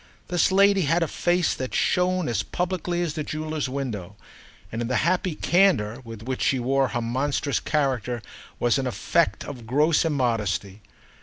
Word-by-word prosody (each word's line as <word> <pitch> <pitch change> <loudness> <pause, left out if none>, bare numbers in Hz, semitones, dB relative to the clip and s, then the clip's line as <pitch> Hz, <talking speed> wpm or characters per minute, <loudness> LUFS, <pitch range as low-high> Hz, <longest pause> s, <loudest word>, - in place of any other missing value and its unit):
This 175 +1 +2
lady 200 0 +5
had 165 +2 +2
a - - 0
face 175 +2 +1
that 130 -1 -4
shone 180 -1 +1
as 115 -4 0
publicly 180 -1 -2
as 165 -3 -2
the 155 - -3
jeweller's 155 -2 -3
window, 110 -9 -4 0.6
and 115 - -3
in 120 - -2
the 125 - -1
happy 180 -1 +1
candour 150 - +2
with 115 -2 -9
which 130 +2 -3
she 135 - +2
wore 135 +2 +1
her 120 - -2
monstrous 135 +4 -1
character 125 -6 -1 0.4
was 120 +3 +2
an 130 - -1
effect 125 - 0
of 120 -5 -8
gross 150 +6 +3
immodesty. 110 - -1
135 Hz, 165 wpm, -25 LUFS, 120-170 Hz, 0.6 s, lady